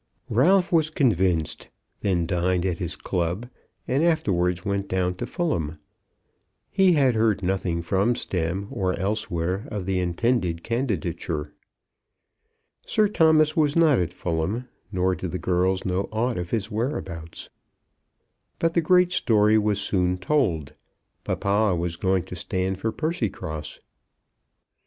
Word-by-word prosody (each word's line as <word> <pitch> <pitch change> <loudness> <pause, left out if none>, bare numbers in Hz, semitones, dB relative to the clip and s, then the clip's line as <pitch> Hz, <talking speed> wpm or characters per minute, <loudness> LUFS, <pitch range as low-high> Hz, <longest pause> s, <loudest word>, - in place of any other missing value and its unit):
Ralph 180 - +4
was 160 -3 +3
convinced, 95 - +1 0.3
then 90 -4 0
dined 90 +1 0
at 90 -3 -1
his 85 -2 -3
club, 90 +5 -2 0.4
and 135 +5 +1
afterwards 90 - +1
went 100 0 -1
down 90 -1 0
to - - -4
Fulham. 85 - -2 1.0
He 190 -2 +4
had 135 -5 +4
heard 110 -3 +1
nothing 90 -2 -1
from 100 +7 +1
Stemm, 90 -2 -2
or 95 -2 -1
elsewhere, 95 -2 -2
of 105 -4 -4
the 95 -1 0
intended 90 -1 0
candidature. 85 - -2 1.3
Sir 215 -1 +2
Thomas 155 -4 +4
was 150 -3 +2
not 160 -5 +5
at 85 -2 -1
Fulham, 90 +8 -2 0.2
nor 95 -1 +1
did 90 0 -4
the 90 - -3
girls 95 +1 0
know 95 +1 -1
aught 115 0 -1
of 90 0 -4
his 110 +1 -2
whereabouts. 95 - -4 1.1
But 165 0 +1
the 170 - +3
great 180 +2 +4
story 110 -6 +3
was 105 -1 0
soon 90 -2 0
told. 90 - 0 0.5
Papa 100 -1 +1
was 85 0 -2
going 95 +1 +1
to - - -8
stand 95 0 -2
for 110 +3 -1
Percycross. 110 - -3
95 Hz, 135 wpm, -25 LUFS, 90-120 Hz, 1.3 s, not